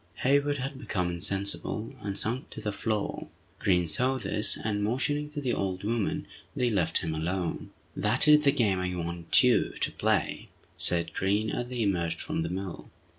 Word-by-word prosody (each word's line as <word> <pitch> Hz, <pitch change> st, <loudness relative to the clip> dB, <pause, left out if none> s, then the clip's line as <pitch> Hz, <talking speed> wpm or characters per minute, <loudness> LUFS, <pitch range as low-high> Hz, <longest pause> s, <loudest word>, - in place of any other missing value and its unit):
Hayward 145 Hz, +2 st, +3 dB
had 135 Hz, +1 st, -4 dB
become 90 Hz, -9 st, -1 dB
insensible, 100 Hz, +5 st, -2 dB
and 100 Hz, -1 st, -3 dB
sunk 120 Hz, +4 st, +1 dB
to -, -, -8 dB
the 105 Hz, -1 st, -2 dB
floor. 105 Hz, 0 st, -2 dB, 0.3 s
Green 90 Hz, -4 st, +2 dB
saw 125 Hz, +12 st, +2 dB
this, 110 Hz, -3 st, +2 dB
and 105 Hz, -1 st, -2 dB
motioning 140 Hz, +7 st, 0 dB
to 150 Hz, 0 st, -5 dB
the 130 Hz, -4 st, -1 dB
old 95 Hz, -1 st, -2 dB
woman, 110 Hz, 0 st, -1 dB, 0.3 s
they 125 Hz, -2 st, +1 dB
left 90 Hz, -6 st, +2 dB
him 80 Hz, -, -2 dB
alone. 85 Hz, +3 st, -2 dB, 0.3 s
"That -, -, +3 dB
is 150 Hz, 0 st, +7 dB
the 140 Hz, -, +5 dB
game 105 Hz, -9 st, +1 dB
I 90 Hz, 0 st, -2 dB
want 85 Hz, -1 st, +1 dB
you -, -, +3 dB
to -, -, 0 dB
play!" -, -, 0 dB, 0.3 s
said 85 Hz, -1 st, -1 dB
Green, 100 Hz, +3 st, 0 dB
as 120 Hz, 0 st, -3 dB
they 125 Hz, -2 st, -1 dB
emerged 85 Hz, -5 st, 0 dB
from -, -, -2 dB
the 80 Hz, -, -2 dB
mill. 95 Hz, 0 st, -5 dB
105 Hz, 175 wpm, -28 LUFS, 90-125 Hz, 0.3 s, is